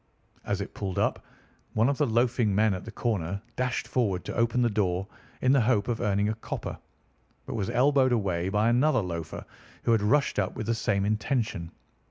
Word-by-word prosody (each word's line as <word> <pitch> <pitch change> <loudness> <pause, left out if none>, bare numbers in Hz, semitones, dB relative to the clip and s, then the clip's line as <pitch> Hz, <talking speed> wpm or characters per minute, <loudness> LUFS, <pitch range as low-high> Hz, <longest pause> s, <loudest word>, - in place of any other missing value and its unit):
As 100 -1 -1
it 100 - -6
pulled 95 -3 -4
up, - - 0 0.5
one 115 +2 +4
of 140 -1 0
the 145 - +3
loafing 115 -2 +2
men 110 0 +3
at 95 - -5
the 115 - -7
corner 100 -5 -2 0.2
dashed 125 -1 -1
forward 100 -8 0
to - - -5
open 115 +1 +2
the - - +4
door 95 -2 0 0.3
in 130 - +4
the 135 -2 +5
hope 110 -3 +2
of 120 -2 -1
earning 100 -2 +1
a - - 0
copper, 110 - -5 0.7
but - - -5
was 105 -4 -2
elbowed 130 0 +3
away 95 -6 0
by 105 +2 +2
another 130 +3 +3
loafer, 85 -3 -5 0.4
who - - +2
had 115 -2 +4
rushed 130 +3 +2
up 95 -2 -1
with 110 - -4
the 115 - +1
same 105 -3 0
intention. 105 - -1
110 Hz, 200 wpm, -28 LUFS, 100-120 Hz, 0.7 s, the